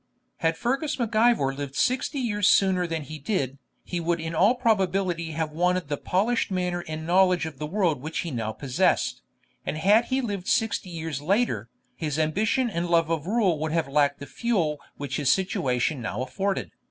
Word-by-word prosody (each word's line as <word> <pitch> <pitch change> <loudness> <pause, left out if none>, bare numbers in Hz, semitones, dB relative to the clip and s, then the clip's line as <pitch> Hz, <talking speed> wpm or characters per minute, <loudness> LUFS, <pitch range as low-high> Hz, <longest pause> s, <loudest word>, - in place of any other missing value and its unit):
Had 165 -2 0
Fergus 275 - -1
Mac 230 -3 -2
Ivor 220 - +4
lived 140 -1 -6
Sixty 255 +3 +1
Years 210 -6 +1
sooner 185 -2 +4
than 165 -2 -3
he 155 +2 -8
did, 140 - -2 0.2
he 175 - -3
would 170 0 0
in 160 +1 -4
all 200 +9 +4
probability 190 -8 0
have 160 0 -2
wanted 180 0 0
the 145 - -1
polished 220 +11 0
manner 180 -2 -1
and 155 0 -5
knowledge 180 0 +3
of 155 -4 -7
the 150 - -3
world 170 -6 0
which 155 +3 -3
he 170 - -5
now 110 -4 -2
possessed; 125 - 0 0.4
and - - -3
had 210 +8 +4
he 260 +2 0
lived 205 -7 -3
Sixty 220 -4 +1
Years 160 -4 -4
later, 165 - 0 0.3
his 150 -3 -3
ambition 210 - +1
and 175 -5 -2
love 165 -1 +3
of 165 0 -1
rule 200 -7 +2
would 155 0 -2
have 165 -4 +1
lacked 140 0 +2
the 140 - -8
fuel 165 - -1 0.2
which 140 -2 -3
his 140 -2 +3
situation 155 - 0
now 115 +2 -3
afforded. 195 +9 -2
170 Hz, 190 wpm, -26 LUFS, 150-200 Hz, 0.4 s, Ivor